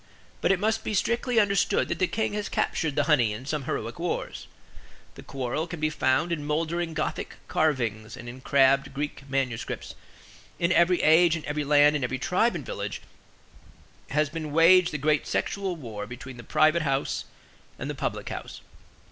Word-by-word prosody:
But - - +3
it 195 - +2
must 220 +2 0
be 215 - -2
strictly 235 +3 +1
understood 200 -2 +2
that - - -2
the 185 - +3
king 220 +1 -1
has 210 -1 -3
captured 155 -4 -1
the 145 - +2
honey 130 -8 +3
in 115 +5 -8
some 145 -1 -3
heroic 115 +5 -4
wars. 175 +1 -3 0.7
The - - -11
quarrel 135 +4 -3
can 175 -1 -7
be 155 0 0
found 150 +4 +1
in 160 -3 -2
moldering 165 +2 -1
Gothic 155 - -3
carvings 115 -8 -1
and 120 - -9
in 125 +2 -9
crabbed 135 0 +3
Greek 140 -1 -5
manuscripts. 130 -4 -3 0.6
In 170 +1 +1
every 175 +1 +3
age, 165 +1 +6
in 160 - -6
every 150 0 -2
land, 145 +1 +5
in 145 - -1
every 125 +1 -1
tribe - - +1
and - - -5
village, - - -5 1.1
has 150 +2 +2
been 155 0 -5
waged 170 +3 +6
the 150 - -2
great 150 +1 +1
sexual 195 -2 -1
war 115 -9 -7
between 125 +2 -9
the 120 - -9
Private 155 +6 +3
House 135 -2 -1 0.5
and - - -5
the - - -3
Public - - -4
House. - - -7
150 Hz, 180 wpm, -26 LUFS, 135-170 Hz, 1.1 s, age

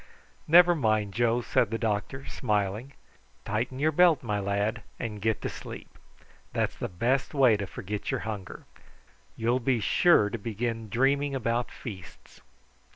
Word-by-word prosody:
"Never 175 +2 +7
mind, 110 - 0
Joe," 120 +1 +2
said 115 - +1
the 115 - -2
doctor 115 +4 -2
smiling; 105 +3 -2 0.5
"tighten 115 +5 -2
your 155 +3 +2
belt, 170 -2 +4
my 105 -3 -1
lad, 100 +3 -1 0.2
and 105 -3 -5
get 110 0 0
to - - 0
sleep. - - -9 0.6
That's - - -1
the - - -4
best 125 - 0
way 130 -5 +5
to 100 -1 -4
forget 100 +2 -5
your - - -1
hunger. 105 -4 -6 0.7
You'll 120 +3 +1
be 125 -1 +1
sure 110 - +4
to 115 - -4
begin 115 +1 -3
dreaming 140 +4 +1
about 120 -1 -1
feasts." 95 -8 -10
115 Hz, 150 wpm, -28 LUFS, 105-130 Hz, 0.7 s, Never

